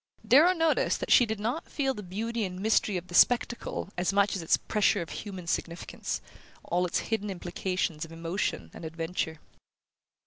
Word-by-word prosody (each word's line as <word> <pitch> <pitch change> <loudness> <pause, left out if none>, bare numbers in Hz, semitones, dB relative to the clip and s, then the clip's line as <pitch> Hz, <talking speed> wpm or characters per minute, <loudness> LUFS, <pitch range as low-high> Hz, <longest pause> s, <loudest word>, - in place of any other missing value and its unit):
Darrow 315 +8 +7
noticed 325 -3 +2
that - - -3
she 245 - +7
did 220 -1 -3
not 235 +10 -3
feel 270 -2 0
the 210 - -7
beauty 220 +5 -3
and 185 -2 -4
mystery 210 -1 +2
of 175 - -5
the - - -11
spectacle 240 -1 +2
as 180 - +1
much 200 0 +2
as 190 - -3
its 165 - +3
pressure 210 -2 +1
of 165 - -11
human 190 -4 -6
significance, 170 0 -3 0.4
all 180 +2 0
its 175 - 0 0.2
hidden 210 -1 -1
implications 175 -3 -2
of 165 - -8
emotion 165 - -3
and - - -10
adventure. 160 0 -3
190 Hz, 175 wpm, -29 LUFS, 170-225 Hz, 0.4 s, Darrow